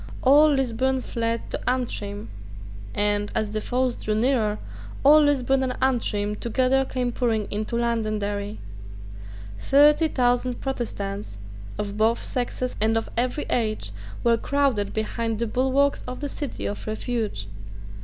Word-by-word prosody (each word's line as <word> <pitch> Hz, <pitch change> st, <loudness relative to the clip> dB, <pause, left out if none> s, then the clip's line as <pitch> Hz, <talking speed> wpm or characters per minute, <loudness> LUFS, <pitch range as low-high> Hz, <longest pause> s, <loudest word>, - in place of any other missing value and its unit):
All 290 Hz, +4 st, +7 dB
Lisburn 265 Hz, -1 st, +1 dB
fled 230 Hz, 0 st, -2 dB
to -, -, -2 dB
Antrim; 115 Hz, -, -3 dB, 0.7 s
and, 205 Hz, 0 st, +1 dB
as 215 Hz, -1 st, 0 dB
the 215 Hz, 0 st, -2 dB
foes 250 Hz, +1 st, 0 dB
drew 215 Hz, -2 st, -2 dB
nearer, 220 Hz, -3 st, +2 dB, 0.5 s
all 300 Hz, +2 st, +8 dB
Lisburn 270 Hz, -2 st, +2 dB
and 255 Hz, -1 st, -2 dB
Antrim 215 Hz, -5 st, 0 dB
together 255 Hz, +4 st, +1 dB
came 250 Hz, -2 st, -2 dB
pouring 225 Hz, -4 st, 0 dB
into 215 Hz, +3 st, -2 dB
Londonderry. 215 Hz, -3 st, -1 dB, 1.0 s
Thirty 295 Hz, -, +5 dB
thousand 245 Hz, -2 st, +1 dB
Protestants, 205 Hz, -, -4 dB, 0.4 s
of 205 Hz, 0 st, -4 dB
both 225 Hz, +2 st, +3 dB
sexes 250 Hz, 0 st, -3 dB
and 220 Hz, +1 st, +3 dB
of 225 Hz, -, -2 dB
every 250 Hz, +5 st, 0 dB
age, 215 Hz, -, 0 dB, 0.3 s
were 235 Hz, -1 st, +4 dB
crowded 270 Hz, -6 st, 0 dB
behind 225 Hz, +1 st, -2 dB
the 235 Hz, -, 0 dB
bulwarks 265 Hz, +4 st, +1 dB
of 250 Hz, 0 st, -5 dB
the 290 Hz, -, -3 dB
City 285 Hz, -2 st, -5 dB
of 205 Hz, -, -4 dB
Refuge. 215 Hz, -, -2 dB
235 Hz, 135 wpm, -24 LUFS, 215-260 Hz, 1.0 s, all